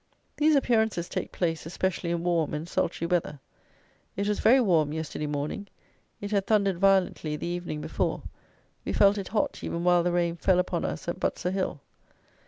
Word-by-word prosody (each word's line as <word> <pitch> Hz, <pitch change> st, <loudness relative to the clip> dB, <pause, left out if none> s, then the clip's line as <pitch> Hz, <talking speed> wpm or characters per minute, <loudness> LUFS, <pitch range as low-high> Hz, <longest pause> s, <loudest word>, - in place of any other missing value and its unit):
These 305 Hz, 0 st, +4 dB
appearances 220 Hz, -9 st, +1 dB
take -, -, -4 dB
place, 165 Hz, -3 st, -2 dB
especially 180 Hz, 0 st, -2 dB
in 170 Hz, 0 st, -1 dB
warm 170 Hz, -4 st, +1 dB
and 155 Hz, +3 st, -5 dB
sultry 170 Hz, -1 st, -1 dB
weather. 170 Hz, -4 st, -1 dB, 0.8 s
It 200 Hz, +1 st, -1 dB
was 210 Hz, -, 0 dB
very 255 Hz, +4 st, +6 dB
warm 165 Hz, -, +2 dB
yesterday 155 Hz, -1 st, -4 dB
morning: 150 Hz, +8 st, -3 dB, 0.5 s
it 205 Hz, 0 st, -6 dB
had 200 Hz, -2 st, +1 dB
thundered 200 Hz, -5 st, +2 dB
violently 190 Hz, -5 st, +2 dB
the -, -, -5 dB
evening 175 Hz, -3 st, -4 dB
before: -, -, -2 dB, 0.6 s
we -, -, -3 dB
felt 200 Hz, 0 st, +4 dB
it 195 Hz, -, -5 dB
hot 215 Hz, -, -1 dB
even 170 Hz, -, -3 dB
while 175 Hz, -1 st, +4 dB
the 175 Hz, +1 st, 0 dB
rain 170 Hz, -1 st, 0 dB
fell 185 Hz, +1 st, +3 dB
upon 180 Hz, -1 st, 0 dB
us 80 Hz, 0 st, -4 dB
at -, -, -3 dB
Butser 180 Hz, -, -1 dB
hill. 185 Hz, -7 st, -2 dB
175 Hz, 180 wpm, -27 LUFS, 165-200 Hz, 0.8 s, very